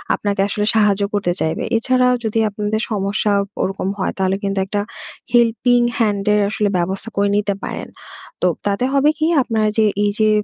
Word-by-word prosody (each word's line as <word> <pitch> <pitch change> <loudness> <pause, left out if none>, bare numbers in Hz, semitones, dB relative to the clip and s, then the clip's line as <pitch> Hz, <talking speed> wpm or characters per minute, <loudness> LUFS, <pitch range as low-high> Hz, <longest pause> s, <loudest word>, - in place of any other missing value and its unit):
আপনাকে 200 -1 -1
আসলে 210 +1 -1
সাহায্য 205 -2 +3
করতে 195 -4 0
চাইবে। 160 0 -1
এছাড়াও 250 +1 +2
যদি 220 +1 0
আপনাদের 210 +2 -2
সমস্যা 205 +1 0 0.3
ওরকম 195 0 -2
হয়, 190 - -1
তাহলে 190 0 +1
কিন্তু 195 0 -1
একটা 205 +1 -2 0.5
helping 240 +1 +3
hand 205 -4 0
এর 210 - +3
আসলে 210 -1 0
ব্যবস্থা 190 +5 -2
করে 200 0 +2
নিতে 205 -1 0
পারেন। - - -5 0.5
তো, 180 - +3 0.2
তাতে 200 +5 0
হবে 280 +2 +4
কি? 310 - 0 0.2
আপনার 225 -3 0
যে 220 - +4 0.2
এইযে 215 +1 +1
210 Hz, 165 wpm, -19 LUFS, 200-225 Hz, 0.5 s, হবে